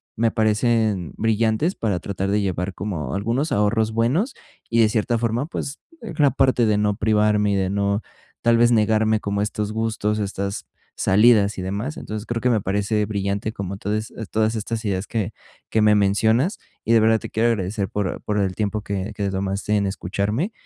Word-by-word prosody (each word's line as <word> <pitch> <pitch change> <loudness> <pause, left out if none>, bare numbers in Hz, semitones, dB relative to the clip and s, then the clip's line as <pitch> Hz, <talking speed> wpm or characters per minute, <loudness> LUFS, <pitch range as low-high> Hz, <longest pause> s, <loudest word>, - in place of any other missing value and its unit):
me 115 0 +1
parecen 110 - +1
brillantes 110 - +1
para 100 -6 -1
tratar 95 -1 -3
de 105 +1 +2
llevar 95 -1 -2
como 85 -10 -4
algunos 120 +10 -1
ahorros 110 +2 +1
buenos 140 - +1 0.4
y, 115 - +1
de 110 - +5
cierta 115 +2 0
forma, 115 +3 0
pues, 150 -3 -5 0.2
la 150 -10 +2
parte 130 -2 +3
de 105 -1 +2
no 105 -1 +1
privarme 105 -1 +2
y - - +1
de 95 -1 0
no, 100 +1 0 0.4
tal 115 0 +4
vez, 120 +1 +4
negarme 110 -1 +3
como 100 -1 -2
estos 105 0 -2
gustos, 110 -1 -1
estas 100 0 -3 0.3
salidas 105 0 +4
y 95 - -4
demás. 105 +11 -3
Entonces, 110 +1 -6
creo 115 -1 -2
que 125 - +2
me 110 -4 +2
parece 105 +2 0
brillante 100 +1 -2
como 100 -1 -5
todas 105 +2 -3 0.4
estas 110 +1 -3
ideas 95 -1 -1
que 110 -2 -2 0.4
que 110 - +2
me 105 0 +5
mencionas, 110 - +2 0.3
y 115 - +3
de 115 - +6
verdad 110 0 +4
te - - -8
quiero 115 +2 +2
agradecer 100 -1 -1
por 100 -3 -3
por 105 0 -2
el 95 -2 0
tiempo 105 +1 -1
que 100 +1 -3
que 100 - -3
te 100 - -1
tomaste 100 +2 -1
en 100 -1 +1
escucharme 100 - -2
105 Hz, 185 wpm, -22 LUFS, 100-115 Hz, 0.4 s, de